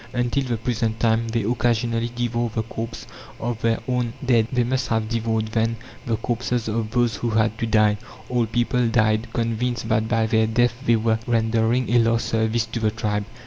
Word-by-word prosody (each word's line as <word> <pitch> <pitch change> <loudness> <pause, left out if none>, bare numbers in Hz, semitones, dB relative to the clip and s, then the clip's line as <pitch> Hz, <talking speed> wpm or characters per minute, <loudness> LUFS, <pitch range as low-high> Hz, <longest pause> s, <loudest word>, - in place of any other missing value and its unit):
Until 125 +3 0
the 120 -2 -1
present 115 -1 -1
time, 115 +1 +2
they 115 -1 0
occasionally 115 +1 0
devour 120 0 -1
the 110 - 0
corpses 115 +1 -6 0.3
of 115 -1 -3
their 115 -1 +2
own 125 -2 0
dead: 115 -3 +3
they 125 -2 +2
must 130 +2 -1
have 110 -1 0
devoured 110 -1 -1
then 115 +1 0 0.3
the 115 - +1
corpses 120 0 -2
of 110 0 -1
those 120 -2 +1
who 120 - -2
had 110 0 +2
to 115 - -1
die. 105 -1 +3 0.3
Old 120 -3 0
people 120 +1 +1
died, 110 -1 +1
convinced 120 0 -1
that 110 0 +2
by 115 -1 +2
their 110 0 +2
death 120 +2 +2
they 120 -3 +4
were 110 0 +1
rendering 115 +1 +1
a 120 - +6
last 115 0 +1
service 110 +1 +1
to 115 +1 -4
the 110 -1 +2
tribe. 105 -2 -2
115 Hz, 190 wpm, -23 LUFS, 110-120 Hz, 0.3 s, a